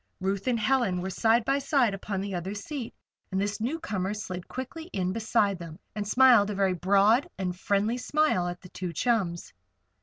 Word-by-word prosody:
Ruth 195 +3 -2
and 240 -2 +2
Helen 220 -5 +1
were 190 +2 -3
side 225 +4 +2
by 275 +1 +2
side 270 -6 +2
upon 195 0 -3
the 200 0 -4
other 185 +3 -3
seat, 240 +4 -6 0.4
and 190 - 0
this 205 +2 -2
newcomer 220 - -2
slid 185 -4 -6
quickly 265 +6 -6
in 185 -1 -1
beside 215 -3 +1
them 165 -2 -8 0.2
and 210 -1 -4
smiled 240 -3 +6
a 210 - -3
very 195 -1 +2
broad 200 - +3
and 180 -2 -2
friendly 205 +5 0
smile 290 -10 +1
at 175 0 -5
the 180 - -12
two 180 -1 -5
chums. 180 - -1
205 Hz, 185 wpm, -28 LUFS, 185-240 Hz, 0.4 s, smiled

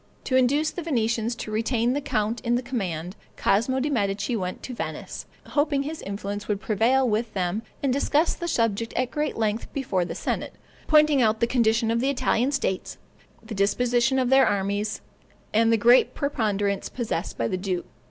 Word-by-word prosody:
To 260 - -1
induce 280 +5 +3
the 355 - -5
Venetians 235 -6 0
to 215 - -6
retain 230 +2 +1
the 290 - -1
count 225 -4 -1
in 235 0 +1
the 245 - -1
command, 185 -8 -3 0.2
Cosmo 235 +6 +2
de' 290 +3 -1
Medici 200 -1 0
went 185 -4 -4
to 255 - -6
Venice, - - -6 0.2
hoping 290 -1 +1
his 310 +2 -5
influence 200 +1 -5
would 205 -2 -1
prevail 240 +4 +2
with 225 +1 0
them, 185 +3 -1 0.2
and 270 -2 +2
discussed 290 +4 +1
the 345 - -3
subject 230 -6 0
at 250 0 0
great 300 0 -2
length 220 0 -1
before 205 -10 0
the 165 -1 -5
senate, - - -3 0.3
pointing 300 -3 +5
out 220 -1 +2
the 235 - +3
condition 230 -2 +2
of 230 - +1
the 265 +3 +1
Italian 255 -1 +1
states, 275 -9 -2 0.5
the 220 0 -7
disposition 240 +5 +2
of 255 -1 +1
their 265 0 +6
armies, 205 +2 -1 0.5
and 225 +1 +4
the 230 - +4
great 240 +4 +5
preponderance 205 -8 -1
possessed 220 -7 -3
by 115 - 0
the - - -1
duke. 185 -1 -2
230 Hz, 180 wpm, -25 LUFS, 205-265 Hz, 0.5 s, their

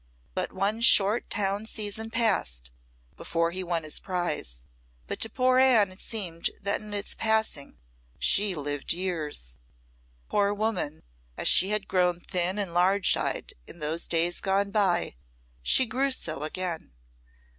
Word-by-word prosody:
But - - -2
one 200 +4 -1
short 210 -1 +5
town 205 +1 -1
season 220 0 -3
passed 125 - 0 0.5
before 170 0 -1
he 185 +2 -4
won 170 -2 -2
his 155 - 0
prize; 165 - -4 0.4
but - - -5
to 225 - -1
poor 255 +2 +2
Anne 235 -7 +5
it 185 - -14
seemed 180 -7 -3
that 200 0 -2
in 210 0 -9
its 205 -1 -2
passing 220 -10 -1 0.4
she 200 -2 +4
lived 145 -1 -3
years. 155 - -2 0.7
Poor 205 0 +1
woman, 205 -8 -2 0.3
as - - -2
she 190 - +6
had 210 -1 -1
grown 180 -2 +1
thin 180 +2 -2
and 195 -5 -3
large 185 +3 +3
eyed - - -3
in - - -11
those 160 +1 -2
days 170 +1 +1
gone 200 +1 0
by, 185 - +1 0.4
she 260 - +4
grew 260 +4 0
so 160 - -1
again. 165 - -4
190 Hz, 145 wpm, -27 LUFS, 170-210 Hz, 0.7 s, she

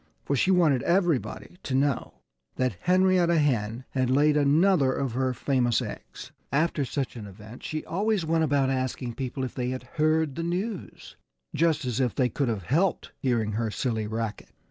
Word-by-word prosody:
For 140 - 0
she 160 - +2
wanted 165 -9 +4
everybody 175 -1 0
to 130 - -3
know 140 -1 0 0.4
that 130 -5 0
Henrietta 180 -2 +3
Hen 120 -5 0
had 130 -2 0
laid 145 +3 +4
another 150 0 +4
of 135 -3 -2
her 130 +2 0
famous 125 -1 +1
eggs. - - -8 0.2
After 150 +1 +1
such 135 0 -3
an 110 -3 -7
event 105 +4 -12
she 155 0 -4
always 200 0 0
went 160 0 +2
about 140 -3 +2
asking 130 -2 -2
people 130 +1 -4
if 130 - -4
they 125 -1 -2
had 130 0 -4 0.2
heard 155 -1 +2
the 165 - -4
news 180 +4 -4 0.4
just 155 -2 +1
as 125 0 -2
if 125 -3 0
they 125 -2 +2
could 140 +4 -1
have 110 -5 -2
helped 165 - 0
hearing 115 -5 0
her 110 +1 -1
silly 110 -1 -2
racket! 110 -1 -4
135 Hz, 175 wpm, -27 LUFS, 125-160 Hz, 0.4 s, wanted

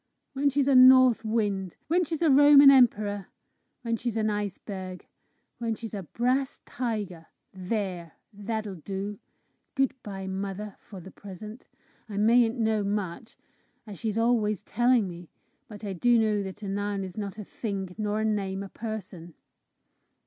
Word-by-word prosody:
When 280 +1 +2
she's 280 0 +1
a 280 - +4
north 255 -2 +7
wind. 205 -5 -1
When 350 +4 +2
she's 325 0 -3
a 315 - +5
Roman 285 0 +8
emperor. 210 -7 +3 0.6
When 230 -1 -1
she's 230 -1 -3
an 215 -1 +1
iceberg. 195 -2 -5 0.5
When 230 -2 -1
she's 225 -1 -8
a 200 - -4
brass 250 - -1
tiger. 210 -9 -4 0.3
There! 185 -3 -4 0.2
that'll 210 0 -4
do. 195 +5 -5 0.6
Good 270 -2 +2
bye, 195 -2 -7
mother, 195 +2 -5
for 195 - -11
the 185 +2 -11
present! 210 +4 -11 0.4
I 200 - -6
mayn't 230 +3 +4
know 220 -2 +1
much, 200 +2 -4 0.5
as 205 -5 -10
she's 220 -2 -2
always 225 -4 +1
telling 240 -1 +2
me, 175 -1 -10 0.4
but 210 -1 -11
I 200 -2 -3
do 240 +7 +3
know 215 -2 +2
that 195 +2 -7
a - - -4
noun 200 0 -2
is 185 -2 -8
not 205 -1 -5
a 215 - -6
thing, 195 -3 -5
nor 210 0 -1
a - - 0
name 195 -2 -1
a 195 - -9
person!" 190 -7 -7
210 Hz, 155 wpm, -27 LUFS, 195-235 Hz, 0.6 s, Roman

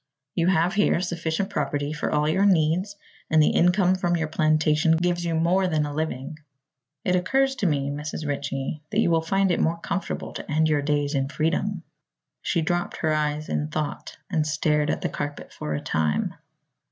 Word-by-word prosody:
You 170 -1 +1
have 180 0 +3
here 205 -4 +3
sufficient 175 +2 -2
property 145 -1 -1
for 150 - -2
all 150 0 +2
your 190 +6 +3
needs 180 +3 +2 0.3
and 160 - +4
the 150 - +5
income 180 +1 +4
from 175 -2 0
your 160 -1 -2
plantation 155 +1 +3
gives 175 +1 0
you 165 -1 -1
more 180 +4 +2
than 155 -3 +1
a 145 - -5
living. 155 0 -4 0.7
It 180 - +2
occurs 270 +9 +2
to 205 - +1
me, 140 -3 0
Mrs. 150 +1 -5
Ritchie, 140 +1 -3
that - - 0
you - - +3
will 165 -1 +3
find 195 +3 +1
it - - +1
more 165 +1 +1
comfortable 190 +3 -4
to - - -7
end 155 +1 +3
your 150 -2 +2
days 145 0 0
in 135 -1 0
freedom." 170 +5 -1 0.6
She 170 -3 0
dropped 175 +2 -1
her 155 -1 +1
eyes 150 0 -1
in 75 0 -1
thought 145 - -4
and 155 -2 0
stared 150 -1 +1
at - - -1
the - - 0
carpet 145 0 -5
for 75 0 -4
a - - -2
time. 75 -1 0
160 Hz, 190 wpm, -25 LUFS, 150-175 Hz, 0.7 s, the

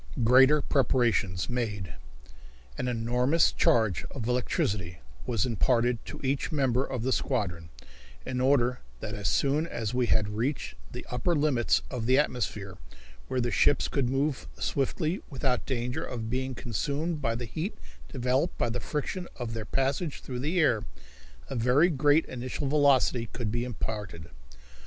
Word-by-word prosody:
Greater 130 +5 +6
Preparations 115 - +1
Made. 105 -8 -3 0.8
An 125 - -3
enormous 125 +6 +2
charge 110 -8 +2
of 120 -5 -6
electricity 100 -7 -1 0.3
was 115 -6 +1
imparted 120 0 +1
to - - -7
each 135 +5 -1
member 135 -4 +2
of 130 -4 -4
the 130 - 0
squadron, 90 -13 -1 0.6
in 125 -1 -2
order 125 -2 +3 0.2
that 105 - -5
as 105 -2 -3
soon 145 - +2
as 115 -7 -3
we 125 -1 +1
had 105 -2 +2
reached 115 - -2 0.2
the - - -7
upper 125 +8 +1
limits 145 -6 +2
of 120 -4 -3
the 130 +1 +5
atmosphere, 105 -8 -1 0.5
where 130 - -1
the 120 -1 0
ships 145 - +3
could 135 -4 0
move 135 - -1
swiftly, 155 +6 -1
without 130 -3 -1
danger 125 -1 -2
of 115 -3 -5
being 130 +1 -2
consumed 145 - -2
by 115 -4 0
the 120 +1 -4
heat 160 - -4 0.3
developed 130 +7 0
by 115 - 0
the 125 - -2
friction 165 +7 -3
of 120 -3 -5
their 110 -1 -4
passage 135 +6 -1
through 125 -2 -5
the 155 +7 0
air, 120 -10 +3 0.6
a - - -6
very 125 +8 +4
great 145 +1 +3
initial 130 +3 -4
velocity 135 -5 +3
could 115 -4 -3
be 120 +1 -1
imparted. 105 -8 -5
125 Hz, 150 wpm, -28 LUFS, 115-140 Hz, 0.8 s, Greater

